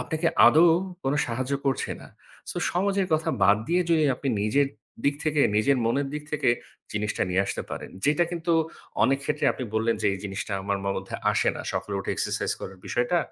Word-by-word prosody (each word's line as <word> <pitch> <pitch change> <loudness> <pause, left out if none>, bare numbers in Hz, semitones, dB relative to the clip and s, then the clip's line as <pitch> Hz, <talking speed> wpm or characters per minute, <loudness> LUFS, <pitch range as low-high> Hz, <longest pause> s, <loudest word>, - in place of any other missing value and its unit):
আপনাকে 160 +1 0 0.2
আদৌ, 165 +3 +7 0.4
কোন 135 - +1
সাহায্য 130 +3 -3
করছে 135 - 0
না। - - -12 0.4
সো, - - -7 0.2
সমাজের 195 +1 +1
কথা 155 0 +2
বাদ 100 +2 +6
দিয়ে 175 +1 +3
যদি 160 -2 +4
আপনি 140 - -3
নিজের 140 +7 +2 0.4
দিক 140 - +3
থেকে, 150 -1 +2 0.2
নিজের 135 +6 +3
মনের 135 +4 +1
দিক 150 - -4
থেকে, 150 -4 +2 0.4
জিনিসটা 105 0 -1
নিয়ে 95 +2 +3
আসতে - - -3
পারেন - - -6
যেটা 150 +4 +3
কিন্তু 170 -1 -1 0.5
অনেক 135 +4 +3
ক্ষেত্রে - - -1
আপনি 130 - -5
বললেন 115 +1 +2
যে, 105 - +2
এই 95 - -6
জিনিসটা 100 +1 -4
আমার 100 0 -1
ম - - -3
মধ্যে 95 0 -6 0.2
আসে - - +2
না। - - -5
সকালে 100 - -3
উঠে - - -3
এক্সারসাইজ - - -1
করার 95 0 -8
বিষয়টা, 125 +9 +1
135 Hz, 195 wpm, -26 LUFS, 105-155 Hz, 0.5 s, আদৌ